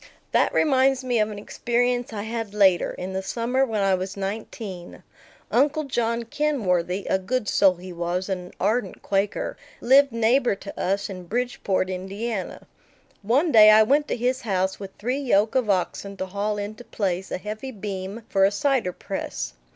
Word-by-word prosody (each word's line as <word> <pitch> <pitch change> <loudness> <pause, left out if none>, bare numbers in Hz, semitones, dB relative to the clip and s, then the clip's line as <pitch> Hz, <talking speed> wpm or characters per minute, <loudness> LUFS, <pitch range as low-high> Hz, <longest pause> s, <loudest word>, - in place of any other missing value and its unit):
That - - +3
reminds 270 -2 +3
me 245 -2 +1
of 215 0 +2
an 210 - -7
experience 245 +3 -1
I 205 -2 -4
had 225 -2 -4
later, 190 -4 +4
in 185 +1 -6
the 190 - -2
summer 240 +6 0
when 220 -5 -1
I 195 -1 +3
was 185 +2 -3
nineteen. 195 -2 -6 0.5
Uncle 295 +5 +2
John 235 -4 -1
Kinworthy 200 - 0
a 190 - +2
good 225 +3 -2
soul 195 -2 +4
he 180 +1 -9
was, 175 +2 -2
and 185 -2 -3
an - - -16
ardent 220 -3 -1
Quaker 200 0 -1 0.2
lived 275 +2 +5
neighbor 230 +1 +2
to 200 +1 -10
us 195 +2 0
in 185 -3 -8
Bridgeport, 210 -4 -1
Indiana. 195 +3 -4 0.6
One 265 - +2
day 215 -3 +9
I 215 0 +8
went 290 +6 +2
to - - -2
his 250 +2 0
house 190 -3 -1
with 195 -1 -6
three 250 +6 -2
yoke 220 -6 +2
of 255 -5 +1
oxen 195 +1 -1
to 190 - -3
haul 205 +2 -2
into 210 +3 -6
place 190 -5 -2
a - - -2
heavy 215 +7 -6
beam 200 -1 -6
for 195 -1 +2
a 195 - +6
cider 225 -3 0
press. - - -5
210 Hz, 175 wpm, -24 LUFS, 190-245 Hz, 0.6 s, day